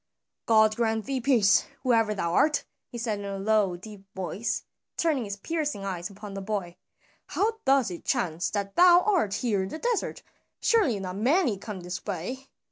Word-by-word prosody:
"God 220 -1 +5
grant 225 -2 0
thee 270 -2 -2
peace, 230 -6 +4 0.2
whoever 225 -4 +2
thou 170 -3 -1
art!" 300 - +3 0.3
he 240 - -7
said 225 -3 -2
in 200 - -6
a 200 0 -4
low 200 -2 +2
deep 205 +1 -11
voice, 190 +4 -3 0.3
turning 300 -8 +1
his 200 -1 -5
piercing 295 -4 -3
eyes 180 -2 -4
upon 205 0 -9
the 195 - -5
boy. 190 -4 -4 0.5
"How 445 +2 0
doth 270 -6 +3
it 175 - -7
chance 180 - 0
that 200 -1 -3
thou 355 0 +7
art 350 - +1
here 210 -5 0
in 190 - -3
the - - -5
desert? 475 +4 -2 0.4
Surely 325 - +2
not 185 0 -5
many 260 - +2
come 195 -1 -7
this 180 +1 -6
way. 215 +8 -5
215 Hz, 180 wpm, -27 LUFS, 195-265 Hz, 0.5 s, thou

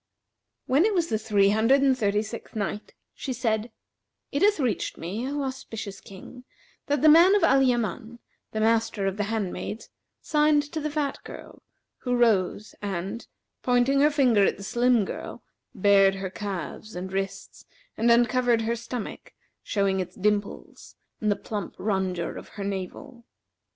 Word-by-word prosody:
When 275 +6 +3
it 425 0 +2
was 335 -2 +1
the 220 - 0
Three 205 -3 +3
Hundred 230 +7 +3
and 270 -1 +4
Thirty 210 -3 +1
sixth 225 +2 -9
Night, 210 0 -4 0.2
She 265 - -5
said, 225 -1 -1 0.6
It 285 - -1
hath 410 -3 +4
reached 245 - -1
me, 210 +10 -4
O 285 0 -2
auspicious 225 -6 -6
King, 200 +6 -12 0.4
that 290 -1 0
"the - - +7
man 340 +6 +7
of 410 - +2
Al 270 0 +5
Yaman, 235 -2 -1 0.3
the 220 - -3
master 225 -2 +1
of 195 +1 -1
the 210 - 0
handmaids, 215 0 -4 0.3
signed 300 -1 +2
to 320 - -3
the 305 - -2
fat 290 -2 -2
girl - - -11 0.4
who 250 -1 -1
rose 215 -3 +1
and, 200 +3 -4 0.3
pointing 250 +2 +2
her 295 - +6
finger 255 -8 +3
at - - +2
the 200 - -9
slim 240 0 +2
girl, - - -7 0.3
bared 195 -1 +5
her 195 -1 -5
calves 205 +1 -6
and 185 +1 -6
wrists 195 0 -5 0.3
and 230 +2 +1
uncovered 240 0 +3
her 230 +1 0
stomach, 235 -1 -7 0.3
showing 195 -2 0
its 185 0 -5
dimples 205 +1 -3 0.2
and 215 - 0
the - - +2
plump 205 -1 -6
rondure 190 -4 -2
of - - -13
her 200 - -4
navel. 195 +4 -6
220 Hz, 160 wpm, -26 LUFS, 200-255 Hz, 0.6 s, the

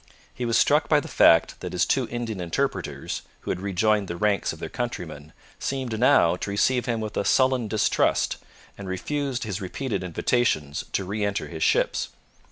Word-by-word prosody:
He 125 - -4
was 115 0 +2
struck 150 +2 +3
by 150 - +5
the - - -7
fact 80 0 +4
that - - -6
his - - +2
two - - +1
Indian 115 -5 -4
interpreters, 85 -2 -2 0.2
who - - -3
had 90 - -3
rejoined 100 +1 +1
the 85 - -4
ranks 100 0 +1
of - - -8
their - - -5
countrymen, 80 -11 -5 0.3
seemed 130 -5 -3
now 120 -9 +5
to 100 - -5
receive 125 +5 +1
him 115 -2 -1
with 110 -1 -5
a - - +1
sullen 130 0 +3
distrust, 105 0 +1 0.4
and 100 -2 -6
refused 135 +7 -2
his 105 -3 -4
repeated 110 +4 -3
invitations 85 - 0
to 95 - 0
re 105 +3 -2
enter 100 0 -2
his 80 -2 -7
ships. - - +1
105 Hz, 180 wpm, -25 LUFS, 90-125 Hz, 0.4 s, by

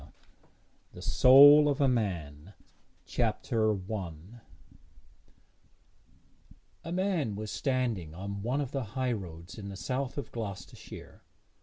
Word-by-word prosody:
XI - - -14 0.9
THE - - -11
SOUL 145 +3 +7
OF 145 0 -1
A 140 - +3
MAN 90 - -3 0.5
CHAPTER 110 -2 0
I 95 -3 -4 2.7
A 165 - -7
man 180 - -1
was 105 0 -6
standing 120 - -2
on 100 +2 -6
one 125 +7 -1
of 140 -2 -4
the 135 -2 -2
highroads 95 -8 -4
in 100 -1 -7
the 95 - -8
south 130 +5 -3
of 145 - -5
Gloucestershire. 105 -5 -8
110 Hz, 115 wpm, -29 LUFS, 95-135 Hz, 2.7 s, SOUL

